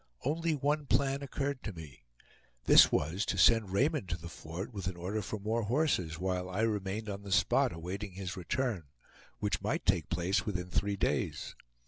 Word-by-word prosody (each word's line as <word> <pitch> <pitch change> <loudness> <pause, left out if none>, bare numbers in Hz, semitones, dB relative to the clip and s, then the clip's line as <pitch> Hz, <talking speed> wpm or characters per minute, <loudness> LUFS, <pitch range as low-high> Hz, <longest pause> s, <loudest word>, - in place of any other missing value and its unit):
Only 160 +3 +1
one 145 +1 0
plan 140 0 +2
occurred 140 -1 -3
to 105 - -5
me; 75 -8 -11 0.6
this - - +8
was 85 +8 0
to - - -1
send 115 -4 +5
Raymond 130 - +1
to 85 - -1
the 85 0 -9
fort 85 +9 -7
with 95 -4 -4
an 95 - -3
order 95 +5 -2
for 105 +2 -5
more 110 +3 0
horses, 110 - +1
while 90 0 -2
I 95 +4 -1
remained 105 -1 -1
on 100 -1 -4
the 100 -1 -8
spot, - - +3
awaiting 90 +4 -5
his 95 -1 -5
return, 105 - -2 0.5
which 100 -4 -1
might - - -1
take - - +2
place 90 +3 +1
within 90 -3 -3
three 100 +2 0
days. - - -1
100 Hz, 180 wpm, -32 LUFS, 90-120 Hz, 0.6 s, this